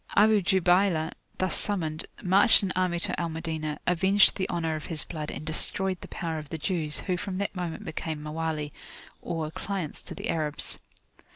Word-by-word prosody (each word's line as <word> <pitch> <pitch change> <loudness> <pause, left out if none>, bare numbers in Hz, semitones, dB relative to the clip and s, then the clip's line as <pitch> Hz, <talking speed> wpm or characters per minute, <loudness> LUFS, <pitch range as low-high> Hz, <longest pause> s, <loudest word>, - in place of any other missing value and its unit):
Abu 210 0 +6
Jubaylah, 180 -3 +3 0.3
thus 185 -1 +1
summoned, 160 -6 0 0.2
marched 195 +4 +5
an 190 - 0
army 180 -2 +1
to - - -1
Al 170 - -1
Madinah, 160 -2 -3
avenged 190 +3 +5
the 190 - -2
honour 165 -2 -1
of 155 - -6
his 160 -3 -1
blood, 155 -3 -5
and 155 - -6
destroyed 185 +3 +2
the - - -8
power 165 -2 -3
of 150 -2 -10
the 160 - -4
Jews, 155 -2 0
who 180 -2 -1
from 185 +1 -4
that 200 0 -2
moment 180 +3 -4
became 160 -2 -4
Mawali, 155 -1 -3 0.5
or 160 -2 -3
clients 190 -3 -4
to - - -9
the - - -5
Arabs. 150 -2 -1
170 Hz, 180 wpm, -28 LUFS, 155-190 Hz, 0.5 s, Abu